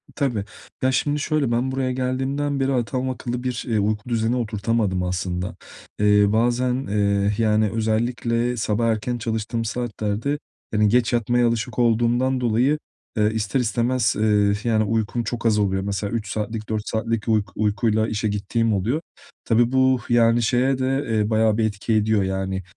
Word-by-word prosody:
Tabii. 125 -9 -1 0.4
Ya, 130 - +2
şimdi 145 +3 0
şöyle, 150 -4 0
ben 120 +3 0
buraya 130 -1 -1
geldiğimden 135 +3 -1
beri 135 0 +1
adam 125 +1 -1
akıllı 125 -1 -4
bir, 125 -2 -2
eee, 115 -3 +1
uyku 105 +3 -1
düzeni 115 0 +1
oturtamadım 105 -4 -1
aslında. 90 0 -3 0.4
Eee, 105 0 +5
bazen, 120 +4 +1
eee, 100 0 +1
yani, 110 -1 +2
özellikle 115 +2 0
sabah 110 +1 0
erken 115 +2 -1
çalıştığım 115 0 -3
saatlerde, 115 +3 -2 0.3
hani, 105 -1 +3
geç 120 +1 +2
yatmaya 120 +1 +2
alışık 115 0 -2
olduğumdan 120 +2 +2
dolayı, 125 +6 +2 0.4
eee, 105 0 +3
ister 110 +5 -1
istemez, 120 0 +1
eee, 105 -2 +3
yani, 110 -2 +2
uykum 110 +2 -1
çok 120 +1 -4
az 110 -2 +3
oluyor. 95 -2 0
Mesela 100 0 -3
3 110 -3 -2
saatlik, 110 0 -4
4 110 -1 -2
saatlik 115 0 -2
uyk 110 -2 +2
uykuyla 110 +1 +1
işe 110 0 -1
gittiğim 105 +2 0
oluyor. 115 - 0 0.4
Tabii 120 +1 +3
bu, 130 -1 +3
yani, 120 0 +4
şeye 125 +4 +2
de, 135 +2 0
eee, 110 -2 +1
bayağı 110 -1 +2
bir 115 - +2
etki 105 +1 -2
ediyor. 110 -1 +2
Yani, 95 0 -2
115 Hz, 160 wpm, -22 LUFS, 105-125 Hz, 0.4 s, Eee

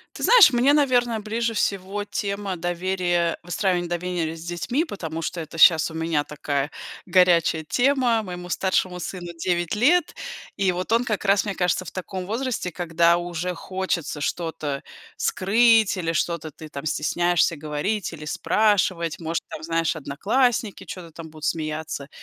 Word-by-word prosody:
Ты - - -6
знаешь, 485 - +8
мне, 250 +3 +4
наверно, 245 -6 +2
ближе 225 +2 -2
всего 200 0 -1
тема 200 -2 -3
доверия, 175 0 0
выстраивания 175 0 0
доверия 175 -2 -2
с 165 - -10
детьми, 175 - -1
потому 165 - -5
что 170 +2 -3
это 160 +1 -8
щас 160 0 +6
у - - -10
меня 160 -2 0
такая 145 -1 -3 0.3
горячая 175 -3 +3
тема. 245 - +2
Моему 180 -2 -7
старшему 185 0 0
сыну 175 0 -6
9 175 0 -1
лет, 305 +10 +3 0.4
и 195 -2 +2
вот 180 +3 -4
он 235 +2 +4
как 215 -4 -2
раз, 200 0 +3
мне 200 - -2
кажется, 180 0 0
в - - -8
таком 185 0 -5
возрасте, 230 -2 -2
когда 170 0 +2
уже 175 +1 -3
хочется 185 -4 -3
что-то 155 -3 -3 0.4
скрыть 220 +2 +3
или 165 -2 -1
что-то 165 0 -1
ты 155 +1 -11
там 140 0 -7
стесняешься 170 +2 +1
говорить 155 +7 -2
или 155 -2 -9
спрашивать. 185 -2 +1
Может, 165 0 -2
там, - - -7
знаешь, 165 0 0
одноклассники 210 - 0
чё-то 175 -3 -8
там 160 0 -10
будут 155 -1 -8
смеяться. 155 -2 -3
180 Hz, 155 wpm, -24 LUFS, 165-205 Hz, 0.4 s, знаешь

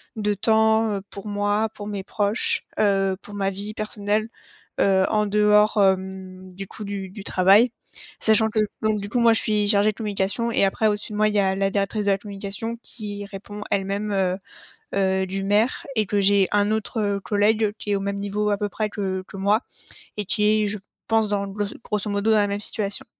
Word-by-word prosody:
de 210 -2 0
temps, 220 +1 +3
heu, - - -5
pour 200 - -8
moi, 205 +1 0
pour 205 - -8
mes 200 -2 -4
proches, 205 +3 0 0.2
heu, 195 -2 +2
pour 205 - -11
ma 195 -1 0
vie 200 +2 -3
personnelle, 215 0 -2 0.5
heu, 190 -1 +4
en 210 -1 +2
dehors, 210 +1 +4
hem, 190 -1 -1
du 195 +1 -7
coup 215 - -9
du 200 -2 -5
du 200 +1 -9
travail. 200 +6 +4 0.5
Sachant 220 0 +4
que 215 - -6 0.2
donc 215 -1 +1
du 200 - -5
coup, 245 - 0
moi 235 -1 +5
je 225 - +2
suis 210 -1 +1
chargée 205 0 +5
de 215 - -18
communication 210 +1 -1
et 200 - +4
après, 215 +3 +1
au-dessus 210 +1 -2
de 210 - -4
moi, 215 - +3
il 210 - -4
y - - +4
a 190 -1 +2
la 195 0 +1
directrice 200 +1 -1
de 200 - +2
la 195 - +2
communication 205 +3 -5
qui 205 -3 -7
répond 200 +1 -9
elle-même, 200 +1 -1
heu 190 -2 +1 0.6
heu, 190 -1 +1
du 195 +1 -3
maire 210 +5 +1
et 215 - +3
que 205 +1 0
j'ai 200 -1 +4
un 205 0 +2
autre, 220 +1 -2
heu, 200 -1 0
collègue 210 +1 +1
qui 205 - -4
est 200 - +3
au 195 - -4
même 200 0 -3
niveau 205 +1 -1
à - - +3
peu 205 0 -2
près 215 +1 -2
que 190 -3 -3
que - - -12
moi 205 +3 +2 0.6
et 210 - -2
qui 210 +2 +2
est, - - 0
je 205 0 -3 0.3
pense 225 -2 +2
dans 200 -1 -1
gloss 200 +1 -4
grosso 210 0 -2
modo 200 +2 0
dans - - +5
la 205 - +3
même 200 0 -2
situation. 205 -1 -1
205 Hz, 215 wpm, -23 LUFS, 195-215 Hz, 0.6 s, moi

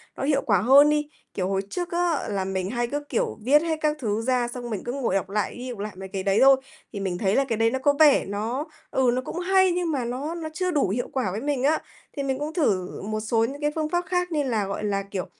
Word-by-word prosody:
nó - - -5
hiệu 280 -1 +2
quả 200 -5 +3
hơn 275 +6 +7
đi. 300 0 0 0.2
Kiểu, 185 -2 -1
hồi 195 0 0
trước 350 - -4
á 345 -3 0
là 195 -2 -1
mình 190 -1 -2
hay 240 +1 -1
cứ, 290 +3 -3
kiểu, 235 - -1
viết 285 +5 +5
hết 325 -1 -1
các 305 0 +1
thứ 220 -2 -1
ra 250 0 +1
xong 240 0 -6
mình 210 -5 -4
cứ 240 - -3
ngồi 260 -8 -1
đọc 195 -1 -1
lại 205 0 -1
đi 250 +1 -6
đọc 240 -4 -7
lại 210 0 -4
mấy 190 +1 -8
cái 190 -1 -4
đấy 195 +1 +2
thôi, 270 0 +8 0.4
thì 200 - -4
mình 185 -2 -2
thấy 195 0 +1
là 275 - +4
cái 230 -4 -2
đấy 225 +1 +3
nó 265 - -1
có 285 +2 +3
vẻ 300 -3 +6
nó, 225 +8 -3 0.3
ừ, 255 -2 +3
nó 255 - 0
cũng 330 - -5
hay 375 +1 +3
nhưng 350 -1 -1
mà 265 -5 -1
nó 275 +8 -3
nó 320 -2 -5
chưa 365 +3 -1
đủ 290 - +1
hiệu 240 +6 -1
quả 250 -9 0
với 210 - -4
mình 280 -3 -1
á. 305 +3 +3 0.4
Thì 280 - -1
mình 265 -1 -1
cũng 300 +2 -4
thử 195 - 0
một 215 +2 -3
số 225 +1 +1
những 280 +5 -6
cái 295 0 +1
phương 310 -1 -1
pháp 350 +1 0
khác 360 -1 -1
như 300 -2 +1
là, 225 -6 0
gọi 200 +2 -4
là, 200 -1 0
kiểu, 195 -2 -4
255 Hz, 285 wpm, -25 LUFS, 205-295 Hz, 0.4 s, thôi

